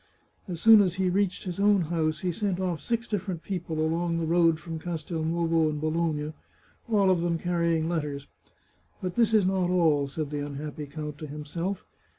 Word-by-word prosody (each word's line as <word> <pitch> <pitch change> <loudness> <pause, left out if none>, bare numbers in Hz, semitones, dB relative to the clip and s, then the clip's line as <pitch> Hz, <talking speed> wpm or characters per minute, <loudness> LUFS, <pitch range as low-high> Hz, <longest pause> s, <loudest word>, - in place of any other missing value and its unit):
As 175 -3 -5
soon 220 +2 +8
as 185 -3 +1
he 185 -1 +1
reached 195 0 0
his 180 -2 -5
own 205 -1 +4
house 155 -2 -1
he 180 - 0
sent 195 0 -1
off 180 -5 -2
six 235 +6 -2
different 190 -5 -3
people 170 -5 -4
along 165 +2 0
the 165 - -1
road 165 -1 +3
from 165 0 -6
Castelnovo 165 0 0
and 150 -1 -3
Bologna, 155 -1 -1 0.6
all 200 -4 +4
of 180 -2 +2
them 170 -1 0
carrying 170 -2 0
letters. 150 -4 -2 0.4
" - - -38
But 180 -1 -2
this 230 +1 +3
is 215 -4 +4
not 185 -1 +1
all," 160 -6 +3
said 150 +1 -4
the 145 -1 -2
unhappy 145 +1 -6
count 150 0 -6
to 155 - -6
himself. 165 +6 -4
170 Hz, 185 wpm, -27 LUFS, 155-185 Hz, 0.6 s, soon